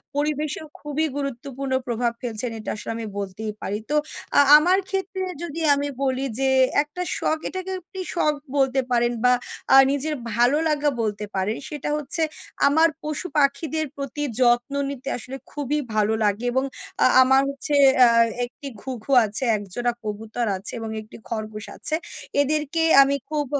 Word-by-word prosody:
পরিবেশেও 300 Hz, +1 st, -2 dB
খুবই 295 Hz, +2 st, -2 dB
গুরুত্বপূর্ণ 275 Hz, 0 st, -4 dB
প্রভাব 235 Hz, 0 st, 0 dB
ফেলছেন 235 Hz, 0 st, 0 dB
এটা 215 Hz, -, -6 dB
আসলে 215 Hz, -, -6 dB
আমি 225 Hz, -, -5 dB
বলতেই 200 Hz, +2 st, -5 dB
পারি। 205 Hz, +2 st, -3 dB
তো 300 Hz, -, 0 dB, 0.4 s
আ -, -, +8 dB, 0.2 s
আমার 360 Hz, +5 st, +3 dB
ক্ষেত্রে 385 Hz, -1 st, -3 dB, 0.2 s
যদি 330 Hz, 0 st, -5 dB
আমি 285 Hz, +1 st, -2 dB, 0.2 s
বলি 265 Hz, 0 st, 0 dB
যে 270 Hz, 0 st, +2 dB, 0.3 s
একটা 300 Hz, +5 st, -8 dB, 0.2 s
শখ 315 Hz, -, 0 dB
এটাকে 375 Hz, 0 st, -5 dB
আপনি 350 Hz, -, -27 dB
একটি 380 Hz, -, -6 dB
শখ 300 Hz, -3 st, +2 dB, 0.2 s
বলতে 265 Hz, 0 st, +2 dB
পারেন 240 Hz, 0 st, +2 dB
বা 250 Hz, 0 st, +5 dB, 0.4 s
আ -, -, +10 dB
নিজের 300 Hz, +2 st, 0 dB, 0.2 s
ভালো 245 Hz, +5 st, +3 dB
লাগা 295 Hz, -1 st, +1 dB
বলতে 210 Hz, -1 st, -2 dB
পারেন। 195 Hz, +4 st, -1 dB
সেটা 295 Hz, -2 st, -5 dB
হচ্ছে 300 Hz, +3 st, +1 dB, 0.5 s
আমার 320 Hz, +3 st, +4 dB
পশু 305 Hz, +3 st, -3 dB
পাখিদের 300 Hz, +3 st, +1 dB
প্রতি 280 Hz, +1 st, -4 dB, 0.2 s
যত্ন 240 Hz, +2 st, +3 dB, 0.2 s
নিতে 275 Hz, -1 st, -6 dB
আসলে 265 Hz, +3 st, -7 dB
খুবই 295 Hz, +1 st, -2 dB, 0.2 s
ভালো 215 Hz, +1 st, +2 dB
লাগে 210 Hz, +4 st, 0 dB
এবং 260 Hz, +2 st, +1 dB, 0.4 s
আ -, -, +6 dB, 0.2 s
আমার 265 Hz, +1 st, +4 dB
হচ্ছে 280 Hz, +2 st, -2 dB, 0.3 s
অ্যা 245 Hz, -2 st, +8 dB, 0.4 s
একটি 270 Hz, +3 st, -11 dB
ঘুঘু 260 Hz, 0 st, -6 dB
আছে, 215 Hz, +5 st, +3 dB
একজোড়া 225 Hz, +5 st, -2 dB
কবুতর 220 Hz, +3 st, -4 dB
আছে 195 Hz, -, +4 dB
এবং 225 Hz, -, -5 dB
একটি 215 Hz, -, -13 dB
খরগোশ 215 Hz, -1 st, -5 dB
আছে। 310 Hz, -, +2 dB, 0.5 s
এদেরকে 305 Hz, +2 st, 0 dB, 0.2 s
আমি 275 Hz, +1 st, +3 dB
খুব 300 Hz, -2 st, -1 dB
270 Hz, 160 wpm, -23 LUFS, 235-300 Hz, 0.5 s, আ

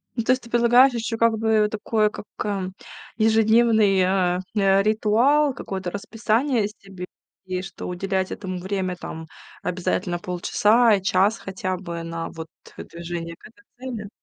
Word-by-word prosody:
Ну, 230 Hz, -, -1 dB
то 245 Hz, -, +2 dB
есть 255 Hz, -, -4 dB
ты 235 Hz, -, -13 dB
предлагаешь 240 Hz, +3 st, +5 dB
ещё, 230 Hz, -1 st, -3 dB
как 230 Hz, -1 st, +3 dB
бы, 220 Hz, -1 st, +3 dB
такое, 215 Hz, 0 st, +1 dB
как, 210 Hz, -, -9 dB, 0.2 s
э, 195 Hz, -3 st, -2 dB, 0.5 s
ежедневный, 220 Hz, -2 st, +4 dB
э, 180 Hz, -1 st, +1 dB, 0.2 s
э, 195 Hz, -1 st, +3 dB
ритуал, 235 Hz, +8 st, +3 dB
какое-то 190 Hz, -2 st, -5 dB
расписание 225 Hz, +4 st, 0 dB
себе, 195 Hz, -3 st, -10 dB, 0.4 s
и 185 Hz, -1 st, -3 dB
что 190 Hz, 0 st, -8 dB
уделять 190 Hz, +1 st, -2 dB
этому 185 Hz, -2 st, -5 dB
время, 190 Hz, 0 st, -2 dB
там, 160 Hz, -2 st, -8 dB, 0.4 s
обязательно 175 Hz, 0 st, -2 dB
полчаса 210 Hz, +6 st, +2 dB
и 195 Hz, -, -3 dB
час 200 Hz, +2 st, +2 dB
хотя 185 Hz, -1 st, -4 dB
бы 170 Hz, -2 st, -6 dB
на, 165 Hz, 0 st, -5 dB
вот, 160 Hz, -1 st, -8 dB, 0.3 s
движение 170 Hz, 0 st, -7 dB
к -, -, -14 dB
этой 235 Hz, +9 st, -23 dB, 0.3 s
цели. 210 Hz, -2 st, -7 dB
200 Hz, 150 wpm, -23 LUFS, 185-225 Hz, 0.5 s, предлагаешь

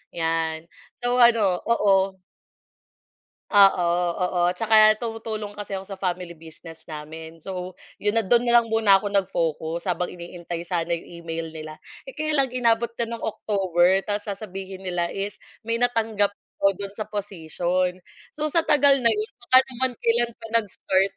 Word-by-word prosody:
'yan. 165 Hz, 0 st, -1 dB, 0.3 s
So, 245 Hz, +1 st, +2 dB
ano 225 Hz, -7 st, +5 dB
oo. 195 Hz, -4 st, +2 dB, 1.3 s
Oo, 195 Hz, -4 st, +6 dB, 0.4 s
oo. 180 Hz, 0 st, -1 dB, 0.2 s
'Tsaka 215 Hz, -1 st, +5 dB
tumutulong 225 Hz, -3 st, -5 dB
kasi 205 Hz, -2 st, -5 dB
ako 190 Hz, -, -10 dB
sa 195 Hz, -, -7 dB
family 180 Hz, -2 st, -3 dB
business 160 Hz, 0 st, -13 dB
namin. 160 Hz, +2 st, -9 dB
So, 180 Hz, +1 st, -7 dB, 0.2 s
'yon 210 Hz, +2 st, +2 dB
nando'n 235 Hz, +3 st, +3 dB
na 240 Hz, 0 st, +6 dB
lang 235 Hz, -, +1 dB
muna 220 Hz, -3 st, +4 dB
ako 205 Hz, -, -6 dB
nag-focus 170 Hz, -4 st, -1 dB
habang 180 Hz, -1 st, -1 dB
iniintay 170 Hz, -1 st, -7 dB
sana 170 Hz, -2 st, -2 dB
'yong 170 Hz, -1 st, -2 dB, 0.2 s
email 165 Hz, 0 st, -4 dB
nila, 155 Hz, -1 st, -8 dB, 0.3 s
eh. -, -, -14 dB
Kaya 310 Hz, 0 st, -1 dB
lang 275 Hz, -3 st, +2 dB
inabot 235 Hz, -2 st, +1 dB
na 235 Hz, -, 0 dB
ng 230 Hz, -, -8 dB
October, 190 Hz, -3 st, +1 dB
tapos 205 Hz, +1 st, -3 dB
sasabihin 195 Hz, -2 st, -7 dB
nila 175 Hz, -2 st, -1 dB
is 200 Hz, +1 st, -4 dB, 0.2 s
may 230 Hz, +1 st, -1 dB
natanggap 225 Hz, -4 st, +1 dB, 0.2 s
daw 195 Hz, -, +3 dB
do'n 200 Hz, +1 st, -5 dB
sa 215 Hz, -, -3 dB
position. 185 Hz, -2 st, -2 dB, 0.3 s
So, 305 Hz, 0 st, -2 dB
sa 330 Hz, +2 st, +1 dB
tagal 285 Hz, -1 st, +5 dB
na 235 Hz, -3 st, +3 dB
'yon 215 Hz, +1 st, -3 dB
baka 255 Hz, +2 st, +5 dB
naman 260 Hz, +1 st, -1 dB
kailan 235 Hz, +1 st, +2 dB
pa -, -, -6 dB
nag-start. 195 Hz, -2 st, 0 dB
195 Hz, 155 wpm, -24 LUFS, 175-225 Hz, 1.3 s, Oo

